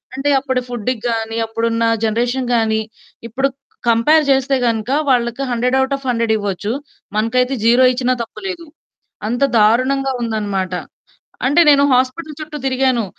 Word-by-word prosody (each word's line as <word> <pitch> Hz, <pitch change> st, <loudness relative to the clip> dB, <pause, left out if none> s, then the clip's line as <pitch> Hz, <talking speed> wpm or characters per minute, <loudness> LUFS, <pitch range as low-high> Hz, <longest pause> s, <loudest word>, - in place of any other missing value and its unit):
అంటే 270 Hz, +2 st, -1 dB
అప్పుడు 260 Hz, -2 st, -1 dB
ఫుడ్‌ 245 Hz, -1 st, -2 dB, 0.2 s
గాని 225 Hz, -1 st, -2 dB
,అప్పుడు 225 Hz, +1 st, -3 dB
ఉన్న 230 Hz, 0 st, 0 dB, 0.2 s
జనరేషన్‌ 240 Hz, +3 st, 0 dB
గాని. 220 Hz, -1 st, +1 dB, 0.5 s
ఇప్పుడు 270 Hz, +4 st, 0 dB, 0.4 s
కంపేర్ 270 Hz, +8 st, +4 dB
చేస్తే 270 Hz, 0 st, +2 dB
గనక 225 Hz, 0 st, -1 dB, 0.2 s
వాళ్ళకి 240 Hz, 0 st, +1 dB
హండ్రెడ్ 250 Hz, +2 st, +1 dB
ఔట్ 265 Hz, +1 st, 0 dB
ఆఫ్ 275 Hz, -1 st, -9 dB
హండ్రెడ్ 230 Hz, -2 st, +1 dB
ఇవ్వచ్చు. 205 Hz, 0 st, -3 dB, 0.5 s
మనకైతే 250 Hz, +4 st, +1 dB
0 240 Hz, +3 st, +5 dB
ఇచ్చినా 250 Hz, 0 st, 0 dB
తప్పు -, -, -12 dB
లేదు. 350 Hz, -3 st, -6 dB, 0.6 s
అంత 245 Hz, +4 st, -1 dB
దారుణంగా 255 Hz, +5 st, +2 dB
ఉందనమాట. 205 Hz, -5 st, -2 dB, 0.7 s
అంటే 290 Hz, +6 st, +4 dB
నేను 280 Hz, -1 st, +5 dB
హాస్పిటల్ 265 Hz, +5 st, -1 dB
చుట్టూ 305 Hz, 0 st, -7 dB
తిరిగాను. 260 Hz, -3 st, +1 dB
245 Hz, 140 wpm, -18 LUFS, 225-270 Hz, 0.7 s, 0